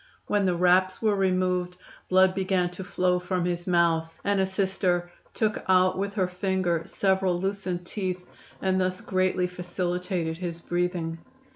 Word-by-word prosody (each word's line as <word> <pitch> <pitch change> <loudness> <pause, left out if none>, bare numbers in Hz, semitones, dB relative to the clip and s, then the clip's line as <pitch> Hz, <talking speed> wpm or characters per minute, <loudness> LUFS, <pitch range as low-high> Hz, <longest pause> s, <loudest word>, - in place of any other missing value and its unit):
When 205 -2 +1
the 180 - +2
wraps 180 +1 +3
were 215 -2 +2
removed 185 -2 0 0.3
blood 185 0 +5
began 185 -2 0
to 180 +1 -7
flow 180 0 +1
from 180 -1 -1
his 175 0 -2
mouth, 165 -2 +2
and 200 -1 +1
a 190 - +2
Sister 190 -2 0 0.2
took 215 -1 0
out 185 0 +4
with 200 +2 -3
her 190 -4 +1
finger 180 -2 0
several 190 -2 +1
loosened 190 -2 -2
teeth, 185 -1 -4 0.4
and 190 0 +2
thus 185 0 -1
greatly 185 -1 +1
facilitated 180 -1 -3
his 170 -2 -4
breathing. 175 -1 -2
185 Hz, 150 wpm, -26 LUFS, 175-190 Hz, 0.4 s, blood